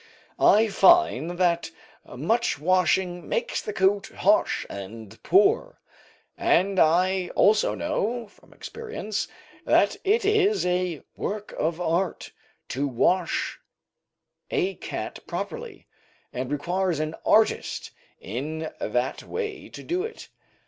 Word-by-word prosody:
I 220 +2 +5
find 205 - +4
that 175 -2 +1 0.4
much 220 - 0
washing 180 +1 +1
makes 235 - -1
the - - -5
coat 195 0 +2
harsh - - +1
and 110 +2 -9
poor, 445 +6 +3 0.6
and 190 +2 +2
I 180 +3 +3
also 215 +1 +4
know 245 -6 -2
from 205 - -23
experience 435 - -5 0.4
that - - +3
it 410 +1 +2
is 420 - +3
'a 180 -3 -1
work 210 0 -4
of 160 +2 -2
art' 175 +1 -1 0.4
to 140 +4 -1
wash 170 +8 0 0.9
a 390 -5 0
cat - - -6
properly, 475 0 -6 0.5
and 125 0 -4
requires 175 +3 -1
an 155 0 -2
artist 220 0 +2 0.3
in 155 +9 -5
that 125 +4 -1
way 425 -4 -5
to - - -10
do 355 +2 -1
it. 450 +2 -7
185 Hz, 115 wpm, -25 LUFS, -, 0.9 s, I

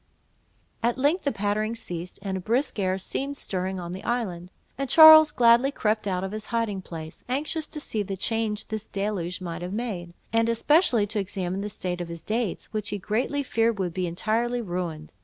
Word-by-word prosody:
At 235 +2 +1
length 290 +7 +1
the 280 - +2
pattering 215 +2 -1
ceased, 175 -5 -6
and 195 -2 -2
a - - -2
brisk 245 +4 0
air 185 -1 +1
seemed 275 +9 -3
stirring 185 0 -3
on 175 -1 -6
the 185 +2 -7
island; 185 -8 -2 0.3
and 275 -1 -3
Charles 315 0 +10
gladly 240 +2 +5
crept 215 -5 0
out 185 -1 -1
of 195 - -3
his 215 0 -6
hiding 225 -4 -1
place, 160 -3 -9
anxious 300 +4 -1
to 300 - -7
see 220 -7 -3
the 195 -1 -4
change 220 +1 -1
this 220 0 -4
deluge 195 -3 -3
might 175 -1 -5
have 180 +2 -5
made, 190 -7 -4 0.2
and 230 0 +3
especially 240 - +3
to 210 +1 -2
examine 190 -1 -3
the 210 - -3
state 180 -3 -4
of 175 - -4
his 170 -1 -8
dates, 220 -3 -2
which 210 -1 -2
he 205 - -2
greatly 235 +8 -1
feared 230 -3 +1
would 180 -3 -2
be 180 0 -1
entirely 230 +8 0
ruined. 175 -7 -4
210 Hz, 195 wpm, -26 LUFS, 185-235 Hz, 0.3 s, Charles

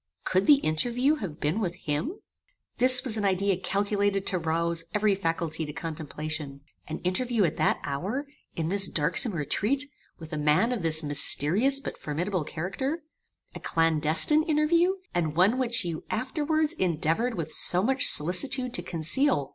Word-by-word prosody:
Could 185 +1 0
the 295 - +8
interview 245 - +1
have 170 - -7
been 155 +8 -1
with 180 -5 -3
him? 180 - -3 0.6
"This 255 0 +6
was 235 -5 0
an 210 - -2
idea 195 0 +1
calculated 200 +1 -1
to 185 - -2
rouse 165 0 -1
every 210 -1 +2
faculty 165 -3 -2
to 150 -1 -6
contemplation. 150 -3 -6 0.3
An 155 - -5
interview 220 +5 0
at 165 - -1
that - - +1
hour, 190 - -3 0.3
in 160 -1 -2
this 195 0 +2
darksome 180 - +1
retreat, 210 - -1 0.3
with 160 0 -11
a 155 - -2
man 150 +11 +2
of 240 -5 -2
this 160 -1 +1
mysterious 165 - +4
but - - -8
formidable 175 +4 -3
character; 265 - -4 0.5
a - - -8
clandestine 165 - +2
interview, 335 +4 +2 0.2
and 160 -3 -1
one 200 +9 +3
which 240 -4 0
you 165 -2 -4
afterwards 305 +4 0
endeavoured 180 - -1
with 160 -3 -4
so 180 +1 +2
much 265 +4 +3
solicitude 245 - +2
to - - +2
conceal! 165 - 0
185 Hz, 155 wpm, -26 LUFS, 160-250 Hz, 0.6 s, the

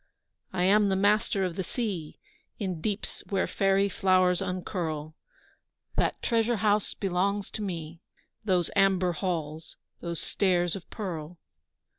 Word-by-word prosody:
I 180 - 0
am 205 +2 +5
the 190 - +2
master 205 0 +3
of 175 -2 -3
the 190 - -2
sea 190 -7 -3 0.4
In 185 -6 -3
deeps 205 +2 -3
where 195 -2 +1
fairy 195 0 +2
flowers 185 -2 +3
uncurl; 175 -5 -3 0.8
That - - +1
treasure 230 0 +2
house 210 -1 +2
belongs 195 +1 0
to - - -4
me, 165 -4 -5 0.4
Those 185 -5 +1
amber 190 -2 +4
halls, 160 -3 -3 0.2
those 170 -2 -4
stairs 175 -4 +1
of 190 - -9
pearl. 175 -5 -5
185 Hz, 130 wpm, -28 LUFS, 175-200 Hz, 0.8 s, am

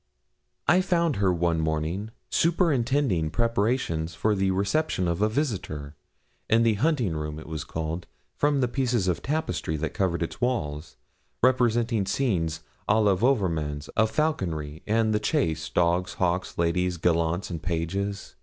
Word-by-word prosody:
I 180 +1 +5
found 170 -5 +1
her 95 -2 +3
one 85 -1 +1
morning 80 +6 -1 0.2
superintending 140 - +2
preparations 110 - 0
for 110 - +1
the 95 -1 +1
reception 100 - 0
of 85 +2 -1
a 105 - +3
visitor, 95 - -3 0.5
in 115 +1 +4
the 115 -1 +4
hunting 120 - +1
room 75 0 -4
it 80 - -9
was 80 -2 -5
called, 80 +2 -4 0.3
from 145 -1 +2
the 125 - +3
pieces 120 -5 0
of 90 - 0
tapestry 150 - -2
that 80 +2 -3
covered 85 -3 0
its 85 - -6
walls, 75 - -2 0.5
representing 120 -4 +2
scenes 90 -10 0 0.3
à 105 - +5
la 100 -2 +4
Wouvermans, 85 - 0
of 110 -1 +3
falconry, 85 - -1
and 110 0 +2
the 105 - +2
chase, 80 - 0
dogs, 90 +1 +1
hawks, 90 0 -1
ladies, 85 +1 +1
gallants, 85 +2 0
and 85 -3 -4
pages. 95 +4 -3
95 Hz, 145 wpm, -26 LUFS, 80-120 Hz, 0.5 s, I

